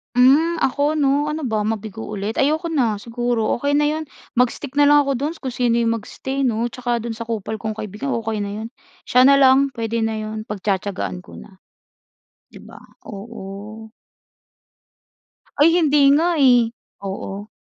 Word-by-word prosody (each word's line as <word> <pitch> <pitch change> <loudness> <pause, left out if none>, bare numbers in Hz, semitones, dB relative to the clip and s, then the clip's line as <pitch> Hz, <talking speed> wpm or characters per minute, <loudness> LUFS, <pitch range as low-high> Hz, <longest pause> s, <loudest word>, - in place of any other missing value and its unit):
Hmm, 285 +7 +5
ako 285 +3 +1
‘no, 290 0 +2
ano 305 +1 -3
ba, 220 -4 -1
mabigo 220 -1 -4
ulit? 210 +1 -4
Ayoko 315 +4 +1
na, 245 -9 +1
siguro, 235 +1 -1
okey 285 +2 +1
na 295 0 +3
‘yon, 315 +1 -3 0.3
mag-stick 255 +2 0
na 290 - +6
lang 290 0 +6
ako 280 - -1
do’n, 295 +4 -2
kung 260 - -4
sino 240 -2 +1
‘yong 230 -1 +2
mag-stay 265 +5 -5
'no, 230 -1 -1
tsaka 245 -1 -2
do’n 235 -1 -4
sa 230 0 -7
kupal 220 -1 -4
kong 220 +1 -4
kaibigan, 215 +6 -4
okey 225 -2 -3
na 200 0 -4
‘yon. - - -5 0.4
Siya 250 +1 +5
na 280 - +7
lang, 270 0 +5
puwede 230 0 -2
na 225 0 -1
‘yon, 215 0 -6
pagtiyatiyagaan 195 -2 -3
ko - - -14
na, 190 -3 -14 0.9
‘di - - -14
ba? - - -13 0.3
Oo. 215 +1 -9 1.7
Ay, 300 +3 +7
hindi 300 -4 +3
nga, 335 +4 +2
eh. 245 -5 +4 0.3
Oo. 195 +1 -6
235 Hz, 165 wpm, -21 LUFS, 215-280 Hz, 1.7 s, na